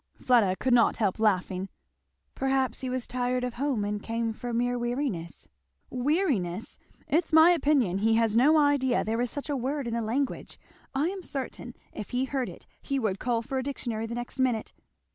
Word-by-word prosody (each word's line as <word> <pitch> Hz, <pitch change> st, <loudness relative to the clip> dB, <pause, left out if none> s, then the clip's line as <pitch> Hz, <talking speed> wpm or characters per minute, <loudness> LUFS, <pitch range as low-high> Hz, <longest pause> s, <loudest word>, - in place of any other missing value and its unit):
Fleda 225 Hz, -7 st, +3 dB
could 255 Hz, +5 st, 0 dB
not 235 Hz, -2 st, +4 dB
help 210 Hz, -2 st, 0 dB
laughing. 190 Hz, -2 st, +1 dB, 0.6 s
"Perhaps 265 Hz, -2 st, 0 dB
he 260 Hz, -, -3 dB
was 255 Hz, -1 st, -2 dB
tired 250 Hz, 0 st, -1 dB
of 250 Hz, -1 st, -2 dB
home 255 Hz, -5 st, -1 dB
and 205 Hz, 0 st, -2 dB
came 230 Hz, 0 st, -2 dB
for 245 Hz, +2 st, -6 dB
mere 245 Hz, +1 st, 0 dB
weariness." 240 Hz, -, -3 dB, 0.4 s
"Weariness! 250 Hz, -, 0 dB, 0.3 s
it's 325 Hz, +3 st, +1 dB
my 320 Hz, +2 st, +8 dB
opinion 280 Hz, -, +2 dB
he 225 Hz, +2 st, +3 dB
has 225 Hz, -1 st, +2 dB
no 290 Hz, +7 st, +5 dB
idea 285 Hz, -4 st, +3 dB
there 225 Hz, +2 st, -1 dB
is 245 Hz, -, 0 dB
such 285 Hz, +3 st, -5 dB
a 290 Hz, -, -1 dB
word 275 Hz, +2 st, -2 dB
in 230 Hz, -, -3 dB
the 235 Hz, -, 0 dB
language, 255 Hz, +5 st, -2 dB, 0.4 s
I 295 Hz, +5 st, +2 dB
am 385 Hz, 0 st, -5 dB
certain 260 Hz, -5 st, -6 dB, 0.2 s
if 210 Hz, -, -7 dB
he 250 Hz, +2 st, 0 dB
heard 265 Hz, -1 st, -2 dB
it -, -, -12 dB, 0.2 s
he 275 Hz, -, -2 dB
would 210 Hz, -6 st, -1 dB
call 235 Hz, -2 st, 0 dB
for 265 Hz, +2 st, -2 dB
a -, -, -2 dB
dictionary 235 Hz, -5 st, -4 dB
the 235 Hz, -, -5 dB
next 240 Hz, +2 st, -6 dB
minute. 245 Hz, -4 st, 0 dB
245 Hz, 190 wpm, -28 LUFS, 225-270 Hz, 0.6 s, my